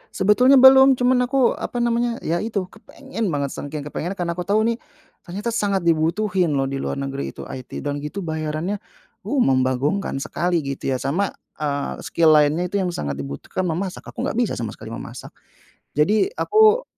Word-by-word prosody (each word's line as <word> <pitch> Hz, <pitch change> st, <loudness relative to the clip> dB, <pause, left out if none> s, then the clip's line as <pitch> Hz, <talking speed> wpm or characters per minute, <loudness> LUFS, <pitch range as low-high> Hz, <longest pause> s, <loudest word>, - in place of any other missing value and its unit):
Sebetulnya 245 Hz, +8 st, +5 dB
belum. 265 Hz, 0 st, +8 dB
Cuma 250 Hz, 0 st, +2 dB
aku 255 Hz, 0 st, +3 dB
apa 240 Hz, -1 st, -3 dB
namanya, 235 Hz, 0 st, +1 dB
ya, 170 Hz, +2 st, 0 dB
itu, 215 Hz, -2 st, -2 dB
kepengen 230 Hz, +1 st, -6 dB
banget, 140 Hz, -5 st, -1 dB
saking 145 Hz, 0 st, -6 dB
kepengennya 165 Hz, +6 st, -4 dB
karena 175 Hz, -2 st, -2 dB
aku 175 Hz, +1 st, -5 dB
tahu 210 Hz, +2 st, +3 dB
nih, 230 Hz, +1 st, 0 dB, 0.5 s
ternyata 205 Hz, +7 st, -3 dB
sangat 200 Hz, -4 st, 0 dB
dibutuhin 170 Hz, +1 st, +1 dB
loh 135 Hz, -, +1 dB
di 135 Hz, 0 st, -3 dB
luar -, -, -3 dB
negeri 140 Hz, 0 st, -4 dB
itu -, -, -8 dB
IT. 130 Hz, -1 st, -7 dB
Dan 145 Hz, 0 st, -2 dB
gitu 150 Hz, +7 st, -5 dB
bayarannya, 160 Hz, +4 st, -3 dB, 0.5 s
uh, 285 Hz, -, 0 dB
membagongkan 130 Hz, +8 st, +1 dB
sekali 175 Hz, -1 st, -1 dB
gitu 140 Hz, -1 st, -4 dB
ya. -, -, 0 dB
Sama, 170 Hz, +9 st, 0 dB, 0.3 s
eee, 145 Hz, -2 st, -2 dB
skill 165 Hz, -2 st, +3 dB
lainnya 150 Hz, +2 st, +4 dB
itu 200 Hz, -, 0 dB
yang 185 Hz, -, 0 dB
sangat 70 Hz, -1 st, -4 dB
dibutuhkan 70 Hz, -, -4 dB
memasak. 180 Hz, +3 st, -4 dB
Aku -, -, -6 dB
nggak 230 Hz, -, -1 dB
bisa 240 Hz, -5 st, +1 dB
sama 115 Hz, -3 st, -4 dB
sekali -, -, -11 dB
memasak. -, -, -9 dB, 0.6 s
Jadi, 210 Hz, -, +3 dB
aku 435 Hz, +3 st, +4 dB
180 Hz, 175 wpm, -22 LUFS, 145-225 Hz, 0.6 s, belum